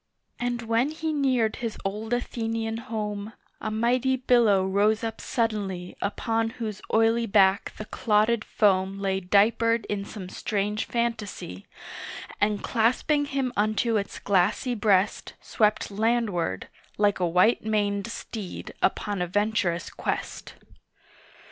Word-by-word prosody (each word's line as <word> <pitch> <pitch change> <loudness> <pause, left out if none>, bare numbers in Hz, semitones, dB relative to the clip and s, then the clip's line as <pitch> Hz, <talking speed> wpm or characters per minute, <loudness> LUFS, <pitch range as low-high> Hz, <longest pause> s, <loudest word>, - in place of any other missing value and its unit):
And 240 0 -2
when 230 +4 +1
he 315 0 -3
neared 255 -6 +1
his 230 -2 -4
old 210 +3 -3
Athenian 225 -2 -2
home, 215 -2 -4 0.3
A - - -2
mighty 245 +4 +1
billow 235 -7 +3
rose 205 +3 +2
up 225 -1 -4
suddenly 200 -6 -2
Upon 225 +2 0
whose 215 -4 -4
oily 225 +1 +3
back 195 -2 +3
the 215 - -6
clotted 215 +1 +1
foam 195 -2 +2
Lay 195 -1 0
diapered 225 +5 +3
in 205 -1 -3
some 200 -2 -8
strange 210 +2 -2
fantasy, 225 - -3 0.7
And 205 0 +1
clasping 255 +6 +2
him 270 -3 -2
unto 215 +2 +1
its 200 -1 -4
glassy 200 +6 +1
breast 205 -3 +1
Swept 210 -1 0
landward, 210 - 0 0.3
like 205 -1 +2
a 180 - +2
white 180 +7 +3
maned 205 -1 0
steed 220 -3 -7
upon 205 -3 0
a 180 - 0
venturous 190 -3 0
quest! - - -4
215 Hz, 125 wpm, -26 LUFS, 200-230 Hz, 0.7 s, billow